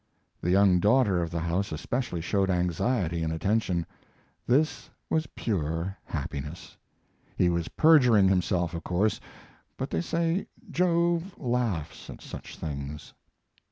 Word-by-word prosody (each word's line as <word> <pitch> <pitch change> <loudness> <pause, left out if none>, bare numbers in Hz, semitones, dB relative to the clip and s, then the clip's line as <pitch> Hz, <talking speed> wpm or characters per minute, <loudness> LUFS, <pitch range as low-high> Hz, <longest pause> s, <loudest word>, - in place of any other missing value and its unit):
The 90 - -1
young 95 -1 +5
daughter 105 -3 +3
of 85 - -2
the 85 0 -3
house 85 +4 -1
especially 90 - -3
showed 95 +3 +1
anxiety 90 0 0
and 80 0 -1
attention. 90 0 0 0.6
This 145 +6 +1 0.2
was 160 -2 +1
pure 85 -2 -2
happiness. 75 +2 -6 0.6
He 90 - +4
was 85 -1 -1
perjuring 125 -11 +5
himself, 90 -2 +1
of 85 - -5
course, 100 +5 +1 0.6
but - - -4
they 80 - 0
say 165 - 0 0.2
Jove 170 +1 +1
laughs 120 - -2
at - - -8
such - - -9
things. 70 -1 -6
95 Hz, 125 wpm, -28 LUFS, 85-125 Hz, 0.6 s, young